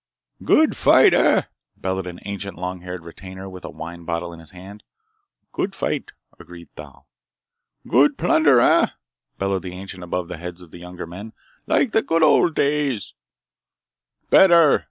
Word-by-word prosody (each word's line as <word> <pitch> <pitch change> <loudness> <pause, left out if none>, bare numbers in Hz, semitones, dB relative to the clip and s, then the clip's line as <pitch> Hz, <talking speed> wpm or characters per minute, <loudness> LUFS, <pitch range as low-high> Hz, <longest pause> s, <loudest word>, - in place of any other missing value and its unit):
"Good 315 0 +3
fight, - - +5
eh?" - - +3 0.3
bellowed 95 0 -3
an 85 -1 -9
ancient, 100 -2 -6
long 90 +1 -5
retired 90 -1 -8
retainer 95 +3 -10
with 95 -1 -11
a - - -7
wine 85 +1 -9
bottle 85 +1 -4
in 85 - -12
his 80 -2 -14
hand. 95 +4 -12 0.7
"Good - - -3
fight!" - - -3 0.3
agreed - - -13
Thal. - - -13 0.8
"Good 290 -1 +3
plunder, 145 -6 +4
eh?" - - +4 0.5
bellowed 95 -1 -1
the 90 -1 -8
ancient 95 0 -9
above 90 0 -4
the 90 -1 -7
heads 90 +1 -8
of 85 - -18
younger 90 0 -9
men. 100 +7 -10 0.3
"Like 255 - +2
the 220 - +2
good 165 -4 +1
old 155 +1 +4
days?" 140 -7 -1 1.2
"Better!" 170 -5 +6
95 Hz, 155 wpm, -21 LUFS, 90-120 Hz, 1.2 s, Better